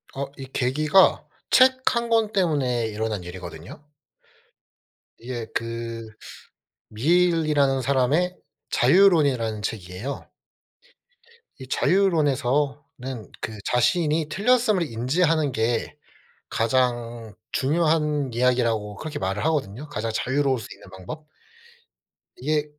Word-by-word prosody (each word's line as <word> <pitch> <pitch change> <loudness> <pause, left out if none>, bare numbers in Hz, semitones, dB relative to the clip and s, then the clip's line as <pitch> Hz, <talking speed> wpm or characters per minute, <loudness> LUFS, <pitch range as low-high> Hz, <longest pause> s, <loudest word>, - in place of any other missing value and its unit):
아 140 - -2
이 135 - -7
계기가 150 +9 +3 0.3
책 260 0 +5
1 235 0 -1
권 225 -2 +2
때문에 135 - +1
일어난 105 -3 -3
일이거든요. 90 - -9 1.4
이게 120 -1 -6
그 115 0 -4 0.8
밀이라는 150 0 +2
사람의 140 +8 +1 0.3
자유론이라는 140 - +3
책이에요. 105 +5 -5 1.3
이 130 - -9
자유론에서는 140 - 0
그 110 - -5
자신이 155 +5 +1
틀렸음을 215 +1 +2
인지하는 150 +5 +1
게 115 0 -1 0.5
가장 120 -2 -1 0.2
중요한 150 -1 +1
이야기라고 115 -4 +1
그렇게 150 +3 -6
말을 95 +2 -2
하거든요. 145 -3 -1
가장 115 -4 -3
자유로울 135 +1 0
수 110 - -9
있는 - - -16
방법. 150 - -9 1.1
이게 150 +2 -1
135 Hz, 235 characters per minute, -24 LUFS, 115-155 Hz, 1.4 s, 책